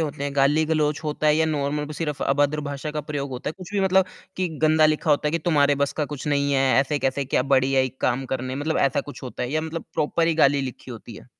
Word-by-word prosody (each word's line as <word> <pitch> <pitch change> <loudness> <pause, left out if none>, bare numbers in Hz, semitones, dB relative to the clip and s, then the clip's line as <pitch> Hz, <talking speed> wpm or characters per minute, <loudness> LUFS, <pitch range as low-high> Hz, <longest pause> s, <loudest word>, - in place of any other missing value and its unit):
होते 145 -3 -3
हैं? 145 0 -3
गाली-गलौज 150 +2 +2
होता 150 0 -1
है 150 - +5
या 160 0 +2
नार्मल 150 -1 -1
ब 150 - -7
सिर्फ़ 150 -2 -3
अभद्र 145 +2 +1
भाषा 145 +1 -5
का 150 - -3
प्रयोग 145 -1 -4
होता 125 -1 -5
है। - - -7
कुछ 185 +1 -10
भी 200 - +2
मतलब 190 0 +4 0.3
कि 185 -1 0
गंदा 155 0 +5
लिखा 155 +1 0
होता 150 +1 +2
है - - -3
कि 170 - +1
तुम्हारे 145 -3 +3
बस - - -5
का 150 - -1
कुछ 140 - -8
नहीं 140 0 +1
है, 135 -1 +3
ऐसे 145 +2 -1
कैसे 135 +1 -1
क्या 125 - +1
बड़ी 135 0 +2
आई 130 0 +3
काम 130 +2 0
करने। 130 0 -3
मतलब 155 +3 -1
ऐसा 140 0 +2
कुछ 145 +1 -11
होता 125 -1 -6
है 125 - -3
या 155 - +1
मतलब 160 +1 -5
प्रॉपर 165 +2 +1
ही 165 - +2
गाली 140 -2 +4
लिखी 130 -1 -7
होती 115 0 -9
है। - - -13
145 Hz, 265 wpm, -24 LUFS, 135-155 Hz, 0.3 s, है